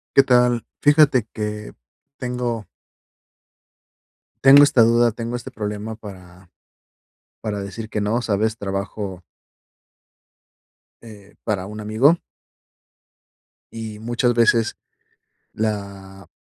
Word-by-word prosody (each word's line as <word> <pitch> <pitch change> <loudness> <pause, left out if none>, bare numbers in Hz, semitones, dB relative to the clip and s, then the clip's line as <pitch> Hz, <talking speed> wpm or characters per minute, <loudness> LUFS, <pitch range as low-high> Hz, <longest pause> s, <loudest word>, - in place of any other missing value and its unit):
¿Qué 135 - +7
tal? 125 -2 +3 0.2
Fíjate 145 -5 +4
que 105 -1 -5 0.4
tengo 125 -4 -3 1.8
tengo 140 +1 +9
esta 140 -4 +4
duda, 115 +1 +4
tengo 115 +2 -4
este 120 - -8
problema 105 +1 -5
para 90 -4 -13 0.9
para 105 -2 -3
decir 105 +3 -7
que 105 - -3
no, 110 +4 0
¿sabes? 110 0 0
Trabajo 100 -2 -5 1.8
eh, 105 -3 -14
para 100 -4 -1
un 105 +1 -8
amigo 115 +11 +3 1.5
y 110 -2 -7
muchas 120 +2 0
veces, 115 -1 +2 0.8
la 100 -3 -5
110 Hz, 95 wpm, -21 LUFS, 105-120 Hz, 1.8 s, tengo